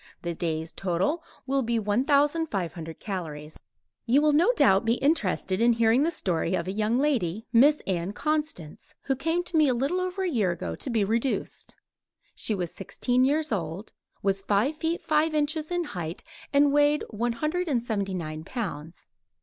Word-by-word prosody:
The 170 -1 -2
day's 160 -1 -3
total 195 - -1 0.2
will 275 +1 +1
be 235 -1 0
1500 220 - 0
calories. 155 -6 -6 0.5
You 255 +5 +5
will 300 0 +3
no 340 +10 +5
doubt 195 - +4
be 230 +1 +2
interested 225 - 0
in 235 0 +5
hearing 230 +2 +3
the 315 - +3
story 180 - -1
of 170 -1 -3
a - - -1
young 215 +3 0
lady, 225 - 0
Miss 285 +6 +5
Ann 180 0 -1
Constance, 295 - -3
who 270 - 0
came 330 +6 0
to 350 - -7
me 310 -2 +5
a 255 - +2
little 280 +9 0
over 370 +1 -2
a - - 0
year 225 - +1
ago 175 - -3
to - - -6
be 225 -4 +1
reduced. 230 +6 -2 0.6
She 215 - 0
was 175 -3 -3
sixteen 245 +6 0
years 300 +2 +1
old, 180 0 -4 0.3
was 195 0 +1
five 205 +9 +1
feet 325 +2 -2
five 310 0 +1
inches 305 +1 0
in 350 -1 0
height 175 - -6 0.3
and 285 0 +4
weighed 290 +1 +3
one 235 +2 -1
hundred 310 +8 -2
and 250 -6 0
seventy 200 -5 -2
nine 155 -3 -5
pounds. 170 - -6
235 Hz, 175 wpm, -27 LUFS, 185-295 Hz, 0.6 s, You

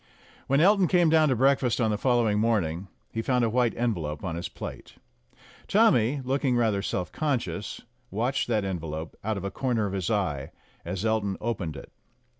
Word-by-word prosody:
When 140 +1 +3
Elton 195 +1 +5
came 175 -1 +4
down 155 -2 +5
to 130 - +2
breakfast 130 -1 +2
on 110 -3 +2
the - - +1
follow 120 -2 +2
ing 105 0 +1
morning, 100 -6 0 0.2
he 115 - -2
found 125 0 +2
a 115 - 0
white 120 -1 +1
envelope 85 -11 -2
on 85 -3 -3
his 85 - -4
plate. - - -8 0.7
Tommy, 145 - +3
looking 130 0 +1
rather 110 -4 +2
self 90 -2 -3
conscious, 130 -9 -2 0.3
watched 120 +6 -1
that 110 -4 0
envelope 80 -4 -4
out 110 0 -1
of 95 - -5
a 100 - -3
corner 120 -1 0
of 100 - -3
his 95 -4 -2
eye 85 -11 -1 0.3
as 90 +4 -4
Elton 110 -3 0
opened 95 -9 -3
it. 70 - -10
110 Hz, 185 wpm, -27 LUFS, 95-130 Hz, 0.7 s, Elton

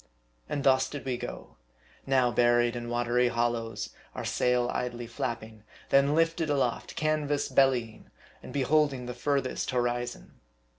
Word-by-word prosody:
And 140 - -2
thus 130 -1 +4
did 145 - -7
we 130 -2 -1
go. - - -8 0.5
Now 130 -2 +3
buried 120 +1 +3
in 120 -1 -5
watery 120 +1 +2
hollows 120 -1 -1 0.3
our - - -4
sail 125 -1 +1
idly 120 -1 -3
flapping; 110 -2 -5 0.3
then 140 +2 +4
lifted 165 -1 +1
aloft 135 -5 -1
canvas 150 -2 0
bellying; 125 -5 +1 0.3
and - - -10
beholding 140 -1 +1
the 125 - -5
furthest 135 +1 -1
horizon. 120 -1 -2
125 Hz, 135 wpm, -29 LUFS, 120-140 Hz, 0.5 s, thus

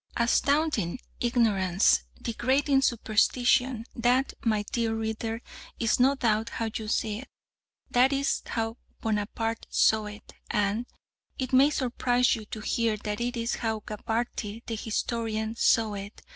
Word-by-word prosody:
Astounding 255 - +1 0.2
ignorance! 195 - +3
Degrading 270 +4 +1
superstition! 245 +1 +2
That, 250 +3 +2
my 215 -3 +1
dear 230 -2 0
reader, 225 +1 -3 0.4
is 230 0 +2
no 265 +3 +5
doubt 225 -3 +1
how 225 -1 -3
you 220 - -4
see 215 -1 -1
it. 265 - -10 0.6
That 255 +2 +4
is 275 0 0
how 225 0 -2 0.2
Bonaparte 225 +1 -2
saw 220 -1 +3
it, 210 +1 -11 0.2
and, 210 +2 0 0.5
it 260 -1 -3
may 270 +3 +6
surprise 250 -3 +1
you 220 -2 -8
to 215 +1 -7
hear, 225 0 0
that 210 +1 -4
is 235 -1 -1
how 220 -2 -2
Gabarty 220 +1 -4
the 230 - -4
historian 220 0 -2
saw 225 -2 +3
it. 200 +1 -8
230 Hz, 130 wpm, -28 LUFS, 215-245 Hz, 0.6 s, may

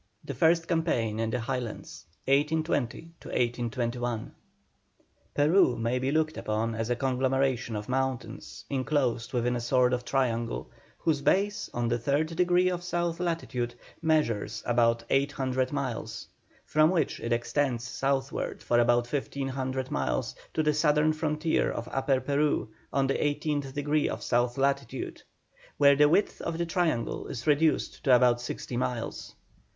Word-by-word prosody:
THE - - -4
FIRST 165 0 +3
CAMPAIGN 120 -11 0
IN 115 0 0
THE 125 +1 -1
HIGHLANDS. 120 -2 -5 0.2
1820 150 +1 0
1821. 120 -1 -2 1.0
Peru 145 -4 +4
may 115 +2 0
be 130 +2 0
looked 155 0 +1
upon 110 +2 -1
as 115 +1 -3
a 120 - +2
conglomeration 130 -1 0
of 105 0 -5
mountains, 130 -1 -3
enclosed 130 -4 0
within 125 -1 0
a - - -1
sort 125 +1 +3
of 125 0 -1
triangle, 120 -4 -1 0.3
whose 150 -3 0
base 200 +8 +1
on 120 0 -1
the 120 +1 0
third 145 +6 0
degree 180 +1 +3
of 180 -1 -1
south 175 -1 -1
latitude 135 -9 -2 0.3
measures 155 -10 0
about 115 -1 +2
eight 140 +1 +2
hundred 130 -2 -1
miles, 120 -6 -4 0.4
from 155 +1 +4
which 170 -5 0
it 115 - -4
extends 120 +1 0
southward 135 +1 -2
for 120 - +2
about 120 0 +3
fifteen 135 +1 -3
hundred 130 0 -3
miles 70 -1 -1 0.2
to 155 - +2
the 150 0 +3
southern 150 +1 +3
frontier 155 +1 0
of 115 - -4
Upper 135 0 +1
Peru 145 -1 0 0.2
on 135 -1 +2
the 135 - 0
eighteenth 145 -1 -1
degree 145 +1 +1
of - - -5
south 120 +1 +1
latitude, 140 +1 -1 0.6
where 140 0 +6
the 145 +1 +5
width 190 +6 +1
of 170 -1 -3
the 170 - 0
triangle 165 -8 -1
is 120 - -6
reduced 155 +1 +2
to 130 -3 +7
about 120 -1 +4
sixty 125 0 -5
miles. 125 -2 -3
135 Hz, 150 wpm, -28 LUFS, 120-150 Hz, 1.0 s, to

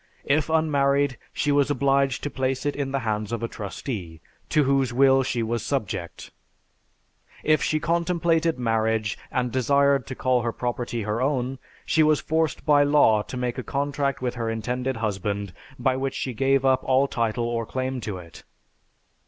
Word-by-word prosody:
If 150 +2 +1
unmarried, 140 -4 +2
she 145 - 0
was 145 0 +3
obliged 135 -1 +1
to 145 - -3
place 130 0 -2
it 145 - 0
in 140 -2 -3
the 135 -1 -1
hands 105 -1 -2
of 115 -1 -3
a - - 0
trustee, 100 - -6 0.3
to 150 - +3
whose 135 -2 +2
will 135 +1 +5
she 120 -2 -1
was 115 0 -2
subject. 100 -11 -4 1.1
If 155 -1 +3
she 155 - +1
contemplated 170 -1 +1
marriage, 110 -2 0 0.2
and 125 -1 -1
desired 140 +1 +2
to 130 - -5
call 130 -1 +1
her 115 0 -1
property 120 -1 -3
her 105 +3 -2
own, 130 -1 -1 0.3
she 160 - +2
was 155 -1 +4
forced 160 -1 -1
by 145 -2 +5
law 145 -7 +4
to 125 - -7
make 125 0 -2
a - - -4
contract 140 -1 -2
with 125 - -1
her 115 -2 -3
intended 125 +3 -2
husband 100 -2 -2 0.2
by 130 +1 +1
which 135 0 -2
she 130 - -3
gave 135 +2 +2
up 130 -1 +3
all 135 +1 +3
title 115 -1 -1
or 115 -1 -2
claim 130 -1 -3
to 105 -4 -4
it. 85 -2 -12
130 Hz, 175 wpm, -25 LUFS, 115-140 Hz, 1.1 s, will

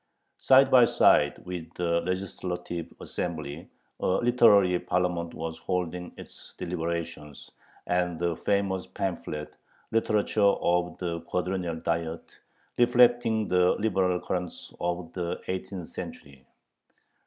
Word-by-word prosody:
Side 135 0 +5
by 125 -2 +8
side - - +4
with 85 -3 -6
the 85 -1 +1
legislative 90 -2 -4
assembly, 80 -2 -5 0.3
a - - -1
literary 105 -7 +5
parliament 90 -2 -1
was 80 0 -5
holding 90 0 -3
its - - -13
deliberations, 85 -4 -5 0.3
the 85 -1 0
famous 100 -2 0
pamphlet 80 -5 -4 0.4
"literature 110 -1 +1
of 90 -3 +2
the 85 -2 -3
Quadrennial 90 -2 -2
Diet," 80 0 -2 0.6
reflecting 120 -3 +4
the 90 0 +4
liberal 95 -4 +1
currents 90 -1 -5
of 85 -1 -3
the 85 -2 -3
eighteenth 95 -1 -5
century. 70 -2 -9
90 Hz, 105 wpm, -27 LUFS, 85-95 Hz, 0.6 s, by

